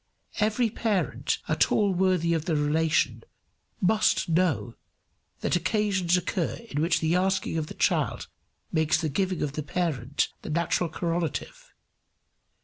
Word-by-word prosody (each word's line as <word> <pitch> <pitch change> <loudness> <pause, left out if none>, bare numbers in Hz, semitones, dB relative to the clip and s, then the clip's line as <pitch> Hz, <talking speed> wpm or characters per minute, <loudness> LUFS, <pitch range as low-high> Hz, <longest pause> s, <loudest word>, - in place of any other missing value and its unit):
Every 220 +2 +2
parent 215 -4 0
at - - +2
all 205 -3 +3
worthy 180 -2 +2
of 160 -1 -1
the 170 -3 0
relation 155 +2 +1 0.6
must 210 +3 +2
know 160 - +1 0.7
that - - +1
occasions 185 -1 +1
occur 180 -1 -1 0.2
in 145 - -1
which 170 +1 +2
the 160 +2 +2
asking 190 -1 +1
of 155 - -3
the - - -9
child - - 0 0.4
makes 160 -1 +2
the 160 -2 -1
giving 185 +4 -1
of 145 -2 -2
the 155 - -3
parent 145 -4 -1
the - - -7
natural 170 +2 0
correlative. 175 - -3
170 Hz, 140 wpm, -27 LUFS, 155-190 Hz, 0.7 s, all